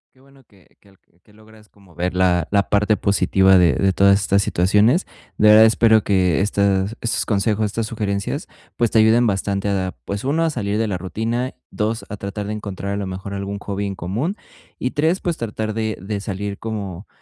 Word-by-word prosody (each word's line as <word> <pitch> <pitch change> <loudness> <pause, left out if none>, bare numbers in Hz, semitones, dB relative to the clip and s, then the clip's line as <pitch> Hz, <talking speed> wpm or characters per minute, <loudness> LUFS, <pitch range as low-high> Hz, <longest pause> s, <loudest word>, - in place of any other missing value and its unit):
Qué - - -26
bueno 135 0 -22
que 100 -6 -26
que 100 - -24
al 95 - -25 0.2
que 105 - -24
logras 110 0 -19
como 95 -5 -22
ver 90 +1 -2
la 90 -3 +2
la 100 -1 +1
parte 105 +1 +2
positiva 95 -1 +3
de 90 -2 +4
de 95 -1 +1
todas 100 +1 +4
estas 100 -1 +2
situaciones. 105 - +2 0.3
De 105 - +5
verdad 110 +1 +8
espero 110 -1 +4
que 90 -4 +2
estas 100 0 +1
estos 115 - -1
consejos, 105 +1 0
estas 110 +1 -3
sugerencias, 100 -3 -3 0.3
pues 120 -2 +1
te 110 - +4
ayuden 110 +2 +4
bastante 100 -1 -1
a, 95 -2 -2
pues 100 0 -4
1, 150 +5 +1
a 160 - 0
salir 100 -6 -2
de 110 0 0
la 95 -3 -3
rutina, 115 +7 -3 0.2
2, 110 +1 -2
a 105 - -6
tratar 100 +1 -5
de 105 - -4
encontrar 100 -2 -5
a - - -2
lo 100 -1 -3
mejor 95 +1 -6
algún 100 0 -4
hobby 100 0 -4
en 95 - -5
común 115 - -3 0.4
y 125 - -2
3, 160 +5 +1
pues 175 -2 -2
tratar 110 -1 -4
de 110 -1 -2
de 100 +2 -4
salir 100 0 -5
como, 100 -4 -6
100 Hz, 205 wpm, -20 LUFS, 100-110 Hz, 0.4 s, verdad